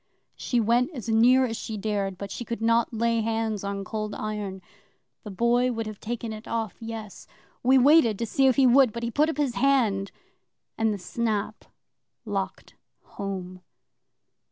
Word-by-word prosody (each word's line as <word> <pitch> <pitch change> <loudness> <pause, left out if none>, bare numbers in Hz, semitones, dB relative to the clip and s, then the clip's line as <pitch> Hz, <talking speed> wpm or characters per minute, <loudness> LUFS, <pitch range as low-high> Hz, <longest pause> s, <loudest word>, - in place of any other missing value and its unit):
She 245 - -1
went 235 +3 +2
as 235 -3 -6
near 245 +4 +5
as 225 -2 -3
she 220 - -5
dared, 200 -2 -2
but 200 0 -7
she - - -5
could 235 0 -5
not 230 +1 +2
lay 230 0 +1
hands 225 -2 -2
on 200 0 -3
Cold 215 +1 -4
Iron. 205 -3 -5 0.6
The - - -7
Boy 240 +5 +2
could 225 -1 -3
have 215 -2 -7
taken 230 0 -4
it 215 +1 -10
off, 225 -3 -3
yes. 225 -3 -8 0.3
We 260 +2 +5
waited 260 -5 +5
to 230 - -2
see 270 +5 +2
if 260 - +4
he 270 - +4
would, 250 -2 +5
but 235 - -5
he 235 - -2
put 300 +6 +2
up 320 - -3
his 285 -5 0
hand, 235 -8 +1 0.6
and 225 -1 +1
the 205 - -2
snap 210 +2 -3 0.6
locked - - -4 0.3
home. 185 -2 -6
225 Hz, 175 wpm, -26 LUFS, 210-240 Hz, 0.6 s, near